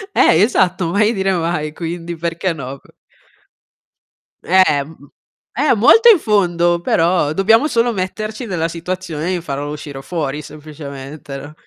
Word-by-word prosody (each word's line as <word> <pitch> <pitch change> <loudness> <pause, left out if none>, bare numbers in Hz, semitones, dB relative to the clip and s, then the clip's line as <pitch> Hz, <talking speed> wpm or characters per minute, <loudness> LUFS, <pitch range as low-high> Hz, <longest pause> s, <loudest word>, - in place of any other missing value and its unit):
Eh, 160 - +5
esatto, 185 -5 +2
mai 210 +4 +2
dire 195 -2 0
mai, 165 -3 -2
quindi 170 0 -5
perché 170 +2 -2
no? 140 -2 -7
Co - - -23 1.5
Eh, 185 -6 +3
m 145 - -14
m 140 - -18 0.6
eh, - - +6
molto 445 - +6
in 425 - +8
fondo, 175 - +1
però 170 -3 +1
dobbiamo 225 - +3
solo 235 -3 +1
metterci 215 +5 -4
nella 170 -5 -2
situazione 170 -1 -4
di 180 - -1
farlo 145 -2 -5
uscire 145 -2 -8
fuori, 150 -3 -4
semplicemente, 145 -2 -9
no? 145 +2 -10
170 Hz, 145 wpm, -17 LUFS, 150-190 Hz, 1.5 s, in